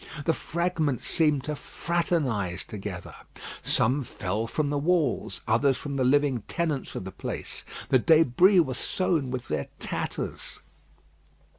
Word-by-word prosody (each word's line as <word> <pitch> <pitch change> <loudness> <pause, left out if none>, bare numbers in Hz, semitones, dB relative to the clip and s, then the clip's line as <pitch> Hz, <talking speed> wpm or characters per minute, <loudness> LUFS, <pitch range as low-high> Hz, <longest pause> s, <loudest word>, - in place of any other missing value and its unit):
The 165 - +3
fragments 165 -6 -1
seemed 150 -5 +2
to 150 +1 -3
fraternise 140 - -1
together. 95 -4 -7 0.5
Some 130 +6 +2
fell 110 -1 -3
from 145 +5 -1
the 145 - +1
walls, 155 -4 +1
others 120 +4 +3
from 140 +2 -5
the 135 - +1
living 135 -2 +3
tenants 155 -6 -2
of - - -3
the 95 - -5
place. - - -6 0.3
The 130 - +5
débris 165 - +5
were 130 - -3
sown 160 0 0
with 125 -1 -4
their 75 -2 -2
tatters. - - -4
140 Hz, 135 wpm, -27 LUFS, 120-160 Hz, 0.5 s, The